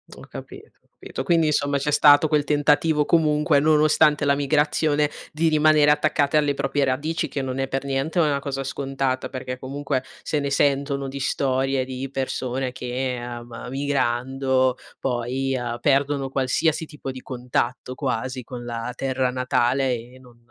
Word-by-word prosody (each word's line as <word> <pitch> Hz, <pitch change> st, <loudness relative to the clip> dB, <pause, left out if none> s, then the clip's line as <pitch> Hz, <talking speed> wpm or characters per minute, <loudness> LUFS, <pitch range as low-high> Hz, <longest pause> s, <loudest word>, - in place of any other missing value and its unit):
Ho -, -, -13 dB
capito, 400 Hz, +3 st, -11 dB
capito. -, -, -7 dB
Quindi 165 Hz, -2 st, +3 dB
insomma 145 Hz, -1 st, +1 dB
c'è 140 Hz, +2 st, -2 dB
stato 145 Hz, +1 st, +6 dB
quel 150 Hz, -1 st, +2 dB
tentativo 150 Hz, +1 st, +2 dB
comunque, 150 Hz, -2 st, +3 dB
nonostante 155 Hz, -1 st, +4 dB
la 140 Hz, 0 st, +3 dB
migrazione, 150 Hz, +1 st, +1 dB, 0.2 s
di 160 Hz, +2 st, +1 dB
rimanere 155 Hz, -1 st, +5 dB
attaccate 150 Hz, -1 st, +1 dB
alle 145 Hz, -2 st, +3 dB
proprie 140 Hz, +1 st, 0 dB
radici, 150 Hz, +5 st, -1 dB
che 140 Hz, -, -3 dB
non 130 Hz, -1 st, -4 dB
è 135 Hz, -, 0 dB
per 135 Hz, +1 st, -2 dB
niente 140 Hz, +5 st, -1 dB
una 150 Hz, -4 st, +2 dB
cosa 135 Hz, -1 st, -4 dB
scontata 135 Hz, -1 st, -2 dB
perché 130 Hz, -1 st, -5 dB
comunque 135 Hz, 0 st, -3 dB, 0.2 s
se 150 Hz, -, -1 dB
ne 140 Hz, 0 st, -2 dB
sentono 140 Hz, 0 st, +1 dB
di 135 Hz, +1 st, -6 dB
storie 135 Hz, -1 st, 0 dB
di 130 Hz, +1 st, -5 dB
persone 130 Hz, -1 st, -3 dB
che, 125 Hz, 0 st, -3 dB
ehm, 120 Hz, -1 st, -7 dB
migrando 130 Hz, -1 st, 0 dB, 0.2 s
poi, 130 Hz, +2 st, -1 dB
ehm, 120 Hz, -1 st, -3 dB
perdono 140 Hz, 0 st, +1 dB
qualsiasi 140 Hz, +5 st, 0 dB
tipo 150 Hz, -3 st, -8 dB
di 130 Hz, -1 st, -7 dB
contatto, 125 Hz, 0 st, -3 dB
quasi, 130 Hz, -1 st, -3 dB
con 120 Hz, 0 st, -8 dB
la 115 Hz, 0 st, -4 dB
terra 130 Hz, -1 st, -1 dB
natale 125 Hz, +1 st, +1 dB
e 120 Hz, +3 st, -11 dB
non 125 Hz, -2 st, -18 dB
135 Hz, 155 wpm, -23 LUFS, 130-150 Hz, 0.2 s, stato